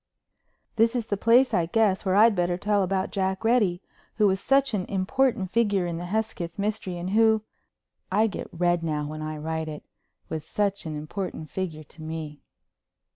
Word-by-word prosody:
This 230 +2 +3
is 240 -3 -1
the 205 - -1
place, 235 +6 +4
I 170 -1 +2
guess, 205 0 +2
where 190 -1 +1
I'd 220 +2 +6
better 175 -1 0
tell 205 +1 +1
about 190 0 -1
Jack 190 0 -1
Reddy, 210 -6 +2 0.3
who 215 - +3
was 190 -1 +3
such 270 +1 +2
an 190 -3 -1
important 200 +1 0
figure 205 -5 +2
in 170 -1 -3
the 175 - -5
Hesketh 185 -4 -3
mystery 200 -3 -2
and 175 +2 -4
who—I 220 -1 0
get 215 - -4
red 175 0 +1
now 150 -2 -2
when 155 +1 -6
I 155 0 -4
write 160 +1 -3
it—was 155 +1 -9
such 200 -4 -1
an 155 - -4
important 155 0 -5
figure 165 -5 -4
to 155 - -15
me. 155 -2 -6
190 Hz, 175 wpm, -26 LUFS, 165-215 Hz, 0.3 s, I'd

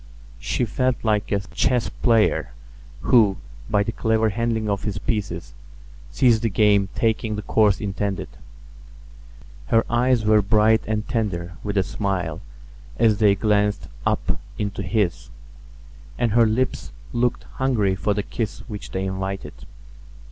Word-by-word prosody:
She 125 - -1
felt 125 +4 0
like 105 -2 0
a 100 -1 +1
chess 120 +4 0
player 115 -3 +1 0.5
who, 105 -6 +4 0.3
by 105 -1 +2
the 115 - -3
clever 110 0 +1
handling 115 0 -1
of 100 -1 -1
his 105 -3 -3
pieces, 100 -6 -3 0.6
sees 120 - +3
the 115 +1 0
game 100 0 +3
taking 110 -1 0
the 105 - -5
course 105 -3 +3
intended. 100 -1 -3 1.4
Her 115 0 +3
eyes 120 -1 +2
were 105 0 +5
bright 110 +2 +3
and 105 -1 -2
tender 95 -8 -2
with 105 -1 -3
a 95 - +4
smile 95 -2 -3 0.6
as 110 -3 +3
they 105 -2 +5
glanced 105 0 +1
up - - -1 0.2
into 100 -1 -3
his; 105 -6 -1 0.9
and 120 -2 +1
her 115 +1 +5
lips 125 +4 -1 0.2
looked 120 0 0
hungry 115 -8 0
for 100 +2 -1
the 105 - -1
kiss 110 0 -4
which 105 -4 -7
they 95 0 -3
invited. 95 0 -4
105 Hz, 140 wpm, -23 LUFS, 100-115 Hz, 1.4 s, were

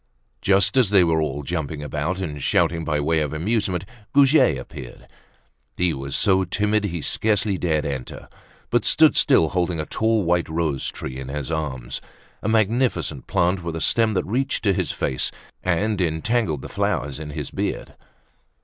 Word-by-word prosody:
Just 100 +5 +3
as 125 -7 +4
they 100 -3 +5
were 80 -2 +2
all 75 -1 -2
jumping 80 -1 -3
about 75 +4 -2
and 75 -6 -4
shouting 80 +4 +1
by 75 -2 0
way 80 +2 +1
of 75 -1 -2
amusement, 95 +1 -1 0.3
Goujet 140 - +5
appeared. 60 - -10 0.7
He 90 -2 +2
was 70 0 -5
so 95 -2 +3
timid 105 +3 0
he 85 -4 -3
scarcely 105 -2 +1
dared 80 -5 0
enter, 65 -3 -5 0.4
but - - +2
stood - - +5
still, 80 - +4
holding 90 -1 -1
a 75 - -2
tall 110 +2 +1
white 85 -1 +1
rose 80 -4 -1
tree 65 0 -6
in 65 - -7
his 75 +2 -4
arms, 65 -6 -3 0.4
a 105 - -2
magnificent 110 - +1
plant 90 +2 +1
with 85 -1 -4
a - - -3
stem 110 +2 +2
that - - 0
reached 135 +6 -1
to 100 -3 +3
his - - -1
face 65 - -1 0.3
and 100 +3 0
entangled 85 - 0
the - - -6
flowers 70 +1 -2
in 75 -1 -6
his 70 - -5
beard. - - -3
85 Hz, 170 wpm, -23 LUFS, 75-100 Hz, 0.7 s, they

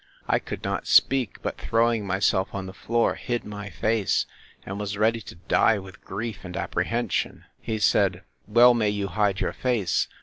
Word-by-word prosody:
I - - +2
could - - -7
not - - -2
speak; 130 -5 +3
but - - -3
throwing 115 -2 +1
myself 95 0 +1
on 95 -1 -4
the 95 - -8
floor, 115 +3 +1
hid 120 -1 -3
my 105 -1 -7
face, 110 -1 0 0.4
and 100 +1 -5
was 105 0 -3
ready 110 +2 +2
to 90 - -11
die 90 +5 +2
with 95 -1 -11
grief 110 +2 -5
and 90 -1 -7
apprehension.—He 115 0 -2
said, 100 -3 +2 0.2
Well 120 +3 +7
may 110 -3 +1
you 100 -1 -2
hide 100 -1 0
your - - -1
face! 120 -8 0
105 Hz, 170 wpm, -25 LUFS, 95-115 Hz, 0.4 s, Well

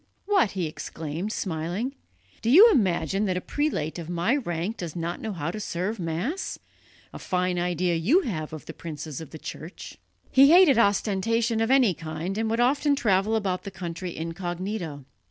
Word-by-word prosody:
"What!" 390 - +2
he 185 -3 -1
exclaimed, 160 +4 -5
smiling, 180 +8 -3 0.5
"do 225 - 0
you 405 - +9
imagine 195 - +1
that 185 -2 0
a - - 0
prelate 185 - -2
of 165 -1 -7
my 175 +9 +1
rank 185 - -3
does 170 -3 -6
not 170 0 -3
know 220 - -3
how 165 -4 -3
to 215 - -6
serve 200 +2 -3
Mass? 180 - -3 0.6
A - - -7
fine 180 -1 0
idea 175 0 0
you 205 - +3
have 160 - -4
of 155 -1 -8
the - - -8
princes 155 -2 -7
of 160 - -9
the 160 - -9
Church!" 160 +3 -9 0.3
He 275 +1 +7
hated 335 -7 +7
ostentation 225 +2 +1
of 225 - +1
any 260 -7 +5
kind 165 +3 -5
and 225 0 0
would 230 +1 0
often 280 +4 +3
travel 210 -4 +2
about 190 -4 -1
the 200 - -7
country 175 -1 -6
incognito. 175 -2 -4
185 Hz, 175 wpm, -26 LUFS, 165-225 Hz, 0.6 s, you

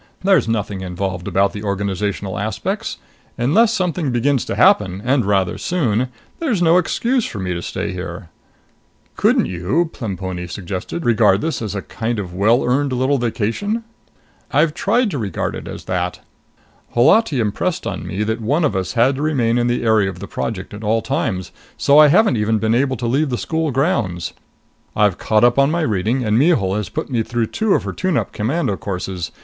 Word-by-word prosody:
There's 190 -10 +4
nothing 105 -3 -2
involved 90 -1 -4
about 100 0 +2
the 105 - -6
organizational 100 -1 -2
aspects. 105 +1 -3 0.4
Unless 205 - +3
something 180 -7 -1
begins 130 +2 +1
to - - -3
happen 95 -2 +4
and 130 0 +2
rather 95 -3 +1
soon 130 - 0 0.3
there's 275 - 0
no 170 +1 +5
excuse 240 +6 0
for - - -6
me 95 -2 -2
to 85 - -4
stay - - -4
here." 90 -2 -7 0.9
"Couldn't - - +3
you," 95 - -1
Plemponi 95 -6 -5
suggested, 95 - -5
"regard 105 -4 +4
this 160 -5 -2
as 105 -3 -4
a 100 - -3
kind 115 +1 -3
of 95 -4 -5
well 110 +7 +3
earned 135 +3 +1
little 130 +2 +1
vacation?" 120 - -1 0.7
"I've 150 +2 +3
tried 225 +5 +1
to 145 - -3
regard 100 -6 -2
it - - -7
as - - -8
that. - - -2 0.8
Holati 140 - +4
impressed 105 -3 -1
on - - -4
me 100 +3 -2
that 110 +2 -2
one 145 +9 +1
of 140 - 0
us 95 -1 -2
had 130 +3 +3
to - - -3
remain 125 -6 +1
in 120 - +1
the 120 0 0
area 110 -4 +3
of 95 - -7
the 100 - -7
Project 100 -4 -4
at 105 +2 -8
all 110 +1 +1
times, 95 -1 -2 0.3
so 145 +2 +5
I 155 - +9
haven't 165 - +4
even 110 +1 +1
been 110 +1 +1
able 130 +1 +1
to 120 - -4
leave 135 +5 +1
the 125 - -1
school 160 +3 -1
grounds. 125 - -1 0.6
I've 105 -4 +2
caught 110 0 +2
up 120 +1 +4
with 140 +1 +4
my 170 +2 0
reading, 115 - 0
and 105 +1 +2
Mihul 125 - +3
has 105 -4 -3
put - - -4
me 120 -3 +1
through 120 +1 -1
two 220 -3 +2
of - - 0
her - - -4
tune 185 -5 0
up - - -2
commando 115 0 -1
courses. 90 -3 -4
115 Hz, 190 wpm, -19 LUFS, 100-145 Hz, 0.9 s, I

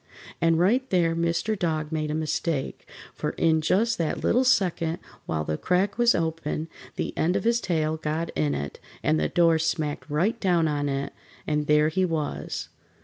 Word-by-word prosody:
And 165 -1 +4
right 240 +10 +2
there 170 -3 +2
Mr. 170 +6 0
Dog 155 -4 -1
made 155 -1 -1
a 150 - -1
mistake, 155 -2 -2 0.2
for - - -3
in 160 -1 +2
just 220 +8 +1
that 165 -2 -1
little 250 - +3
second 175 - +2 0.3
while 80 -1 -1
the 75 0 -3
crack 195 +4 +1
was 240 0 +5
open 160 -1 -2 0.3
the - - -3
end 175 +3 +1
of - - 0
his 235 +1 +2
tail 160 -3 0
got 155 +2 -2
in 75 -2 0
it, 70 0 -5 0.2
and 80 - +2
the 75 - 0
door 165 -2 +4
smacked 155 -2 -2
right 180 +11 +1
down 175 -4 +2
on 145 -1 -1
it, 140 0 -3 0.3
and 150 -1 -1
there 150 0 +4
he 185 +4 0
was. 160 -5 -3
165 Hz, 180 wpm, -26 LUFS, 150-180 Hz, 0.3 s, was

